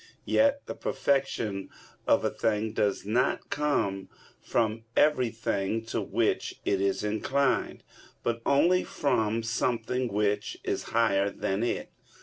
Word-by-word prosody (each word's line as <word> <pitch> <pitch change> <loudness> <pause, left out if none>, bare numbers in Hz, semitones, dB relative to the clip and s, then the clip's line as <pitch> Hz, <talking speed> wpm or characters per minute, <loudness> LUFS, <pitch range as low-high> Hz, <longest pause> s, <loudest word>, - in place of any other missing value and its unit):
Yet 280 0 +2
the - - -5
perfection 115 -8 -1 0.4
of - - +4
a - - +1
thing 110 0 -1
does 100 -3 0
not 120 +6 0
come 120 -10 0 0.3
from 110 0 0
everything 115 -6 +1
to 115 - -2
which - - -1
it 95 -1 +1
is 100 +1 0
inclined, 130 +6 0 0.4
but 115 0 -1
only 175 +8 +4
from 115 -5 0
something 115 +2 -1
which 105 0 0
is - - -2
higher 100 -4 +2
than 95 0 -2
it. 120 - -2
115 Hz, 125 wpm, -28 LUFS, 105-130 Hz, 0.4 s, of